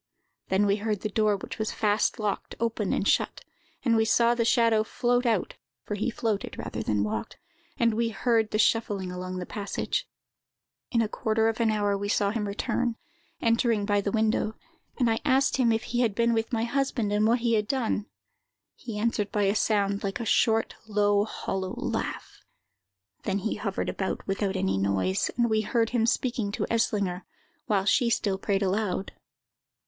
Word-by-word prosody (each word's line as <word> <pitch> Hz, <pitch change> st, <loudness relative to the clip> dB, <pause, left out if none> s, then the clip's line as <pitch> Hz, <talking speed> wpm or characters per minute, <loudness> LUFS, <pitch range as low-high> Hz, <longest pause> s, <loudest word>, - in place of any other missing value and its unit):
Then 190 Hz, +2 st, +2 dB
we 200 Hz, 0 st, +2 dB
heard 210 Hz, -1 st, -2 dB
the 215 Hz, -, -2 dB
door, 215 Hz, -1 st, +2 dB
which 195 Hz, -, -8 dB
was 220 Hz, -, -1 dB
fast 210 Hz, 0 st, +1 dB
locked, 210 Hz, -2 st, -3 dB
open 225 Hz, -3 st, -1 dB
and 200 Hz, -, 0 dB
shut; -, -, +1 dB, 0.4 s
and 230 Hz, -2 st, +4 dB
we 220 Hz, -, +4 dB
saw 235 Hz, +1 st, +4 dB
the 240 Hz, -1 st, +1 dB
shadow 230 Hz, -2 st, +3 dB
float 245 Hz, +2 st, 0 dB
out 220 Hz, -6 st, +1 dB, 0.3 s
(for -, -, -5 dB
he 210 Hz, +4 st, -1 dB
floated 220 Hz, -3 st, -2 dB
rather -, -, -4 dB
than 105 Hz, -1 st, 0 dB
walked), 105 Hz, 0 st, -4 dB, 0.4 s
and 230 Hz, -1 st, +3 dB
we 230 Hz, +1 st, 0 dB
heard 225 Hz, 0 st, +1 dB
the 215 Hz, -, -1 dB
shuffling 205 Hz, -4 st, +1 dB
along 185 Hz, 0 st, -5 dB
the 180 Hz, -, -4 dB
passage. 210 Hz, -, -3 dB, 0.8 s
"In 230 Hz, -2 st, +2 dB
a -, -, 0 dB
quarter 220 Hz, +1 st, 0 dB
of 225 Hz, -, -3 dB
an 230 Hz, -1 st, +3 dB
hour 205 Hz, -2 st, +1 dB
we 205 Hz, +1 st, -3 dB
saw 200 Hz, -1 st, +2 dB
him 210 Hz, -2 st, -2 dB
return, 230 Hz, +3 st, -1 dB, 0.5 s
entering 230 Hz, -2 st, +2 dB
by 205 Hz, -1 st, +2 dB
the 200 Hz, -, -2 dB
window; 220 Hz, 0 st, +1 dB, 0.4 s
and 245 Hz, -, +2 dB
I 225 Hz, 0 st, +1 dB
asked 270 Hz, +1 st, +3 dB
him 245 Hz, -3 st, +3 dB
if 225 Hz, 0 st, 0 dB
he 240 Hz, -, -2 dB
had 230 Hz, -5 st, +2 dB
been 235 Hz, +1 st, +2 dB
with 225 Hz, +2 st, -1 dB
my 225 Hz, -2 st, 0 dB
husband, 240 Hz, -4 st, 0 dB
and 210 Hz, +1 st, +3 dB
what 235 Hz, +1 st, +2 dB
he 235 Hz, -1 st, +1 dB
had 210 Hz, -1 st, +1 dB
done. 230 Hz, -4 st, -1 dB, 0.7 s
He 230 Hz, -4 st, -7 dB
answered 210 Hz, -2 st, 0 dB
by 210 Hz, -, +1 dB
a 195 Hz, 0 st, +3 dB
sound 200 Hz, -2 st, +1 dB
like 195 Hz, +2 st, -2 dB
a 235 Hz, -, -3 dB
short, 225 Hz, 0 st, +2 dB
low, 205 Hz, -1 st, +2 dB
hollow 190 Hz, -3 st, -4 dB
laugh. -, -, -4 dB, 0.8 s
Then 195 Hz, -1 st, -1 dB
he 205 Hz, +2 st, -2 dB
hovered 200 Hz, -3 st, -3 dB
about 190 Hz, -, -3 dB
without 195 Hz, 0 st, -1 dB
any 95 Hz, -, 0 dB
noise, 95 Hz, -1 st, +1 dB
and 240 Hz, -1 st, +3 dB
we 220 Hz, -1 st, +2 dB
heard 225 Hz, +1 st, 0 dB
him 235 Hz, -2 st, +2 dB
speaking 235 Hz, -4 st, 0 dB
to -, -, -1 dB
Eslinger, 200 Hz, -5 st, 0 dB, 0.5 s
while 195 Hz, -3 st, +1 dB
she 235 Hz, +3 st, +3 dB
still 200 Hz, -4 st, 0 dB
prayed 200 Hz, 0 st, 0 dB
aloud. 195 Hz, 0 st, -1 dB
215 Hz, 185 wpm, -27 LUFS, 200-230 Hz, 0.8 s, and